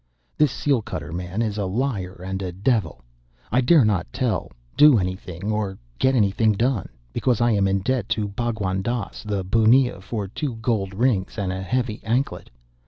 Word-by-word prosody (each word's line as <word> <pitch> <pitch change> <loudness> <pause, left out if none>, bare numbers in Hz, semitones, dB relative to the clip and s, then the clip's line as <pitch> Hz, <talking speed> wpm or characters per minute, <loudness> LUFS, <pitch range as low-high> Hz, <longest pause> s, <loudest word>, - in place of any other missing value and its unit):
This 150 -4 +3
seal 140 -4 +1
cutter 80 -6 -6
man 90 +5 -2
is 105 -2 -2
a 100 - 0
liar 95 -5 -2
and 95 +1 -3
a 90 -2 -3
devil. 95 - -1 0.5
I 125 +4 +3
dare 135 0 +5
not 95 - 0
tell, - - -1 0.2
do 150 -4 +7
anything, 95 +1 -3
or 105 -3 -2 0.2
get 130 0 +3
anything 110 0 +3
done, 115 -1 0 0.2
because 125 -4 +1
I 120 0 +3
am 100 -2 +2
in 95 0 +1
debt 125 0 -1
to 105 -1 -1
Bhagwan 100 -3 -2
Dass 120 0 -3
the 100 -2 -2
bunnia 115 +2 +3
for 105 0 -4
two 130 +5 -4
gold 110 -4 -1
rings 110 -4 +1
and 95 -3 -1
a 95 - -4
heavy 115 +2 -2
anklet. 120 +5 -1
105 Hz, 175 wpm, -23 LUFS, 95-120 Hz, 0.5 s, do